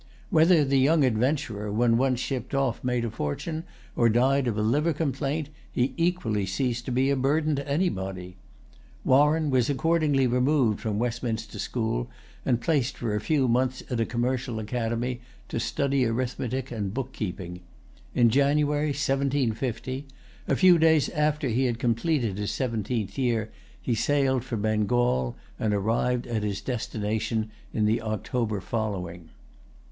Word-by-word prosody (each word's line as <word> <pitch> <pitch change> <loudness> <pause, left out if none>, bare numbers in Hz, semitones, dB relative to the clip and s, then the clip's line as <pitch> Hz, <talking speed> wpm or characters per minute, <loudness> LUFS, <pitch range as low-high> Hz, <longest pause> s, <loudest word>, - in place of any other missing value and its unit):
Whether 160 -1 +5
the 135 0 +2
young 150 +3 +4
adventurer, 120 -3 0
when 115 +2 +3
once 130 0 +2
shipped 130 -1 -3
off, 135 -4 0
made 125 -1 0
a 115 - -3
fortune, 155 - -3 0.3
or 120 -1 +4
died 130 +4 +3
of 110 -3 -1
a 105 - +1
liver 150 +9 +2
complaint, 145 0 -2 0.2
he 125 +2 0
equally 165 - 0
ceased 120 +4 -1
to 130 - -3
be 130 +3 +2
a - - +3
burden 150 +3 +1
to 140 +1 -5
anybody. 95 - -2 0.7
Warren 150 +3 +4
was 125 -1 +2
accordingly 150 -2 +2
removed 125 -2 +2
from 105 -2 -2
Westminster 115 -1 -3
school, 110 - -2 0.4
and 120 -3 +3
placed 145 0 0
for 115 -3 -2
a 105 - -1
few 140 0 +2
months 125 +2 +1
at 120 - 0
a 115 - +2
commercial 125 0 -1
academy, 120 +2 -2 0.3
to - - -2
study 140 +2 0
arithmetic 125 +2 -2
and 105 -3 -3
book 135 -1 -3
keeping. 90 -3 -5 0.6
In 120 -2 +5
January, 145 +2 +2
1750, 135 -2 -1 0.4
a - - +2
few 180 -3 +6
days 160 -2 +4
after 150 -2 0
he 125 +3 +1
had 120 -2 0
completed 115 - 0
his 105 - -2
seventeenth 115 -3 -2
year, 115 -4 0 0.3
he 125 - -1
sailed 130 +2 +1
for 125 -3 -4
Bengal, 105 - +1 0.2
and 105 -1 +1
arrived 120 +4 0
at 115 -3 -2
his 100 -2 -2
destination 110 -2 -2 0.2
in 110 - 0
the 110 +2 +2
October 110 0 -2
following. 90 -6 -4
125 Hz, 150 wpm, -26 LUFS, 110-140 Hz, 0.7 s, few